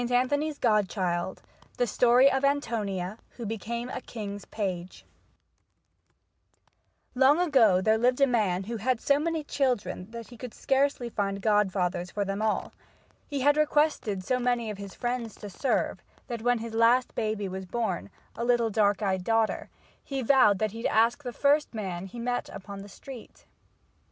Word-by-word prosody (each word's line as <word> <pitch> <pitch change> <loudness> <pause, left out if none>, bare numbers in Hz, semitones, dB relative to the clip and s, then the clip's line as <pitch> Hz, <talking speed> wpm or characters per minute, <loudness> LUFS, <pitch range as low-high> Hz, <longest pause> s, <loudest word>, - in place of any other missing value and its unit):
ANTHONY'S 285 +5 +1
GODCHILD 190 -5 0 0.3
The 245 - +2
Story 245 +4 +5
of 270 +1 0
Antonia 215 -8 -1 0.2
who 235 - -5
became 235 +3 -4
a 255 - -5
King's 205 -4 -7
Page 185 -4 -5 2.1
Long 270 +5 +5
ago 260 - +4
there 220 +2 +3
lived 250 +2 +2
a 275 - +6
man 210 -8 +1
who 230 +4 -4
had 245 +2 0
so 280 +3 +2
many 325 0 -1
children 240 -10 -1
that 230 -1 -8
he 240 - -12
could 245 -1 -8
scarcely 270 -2 +1
find 200 -3 -2
godfathers 190 -4 +1
for 205 +1 -2
them 195 +2 -3
all. 220 -1 -1 0.5
He 285 -3 -3
had 290 +2 +4
requested 295 -10 +1
so 255 +6 0
many 240 -3 0
of 205 - -8
his 200 -1 -8
friends 240 -3 -3
to 205 - -9
serve, 260 +8 -1 0.2
that 235 -3 -5
when 245 +1 +2
his 230 0 -6
last 235 +3 +3
baby 215 -2 -2
was 190 0 -6
born, 185 - -2 0.3
a 235 - -3
little 240 -2 +2
dark 205 0 +2
eyed 190 -2 0
daughter, 225 +1 0 0.3
he 270 -2 -3
vowed 240 -5 +5
that 215 +1 -1
he'd 225 +2 -2
ask 230 +6 +2
the 245 - -4
first 285 +1 +2
man 190 -3 -4
he 215 - -11
met 245 +1 -2
upon 200 0 -8
the 200 - -11
street. 250 +3 -12
230 Hz, 165 wpm, -28 LUFS, 200-255 Hz, 2.1 s, a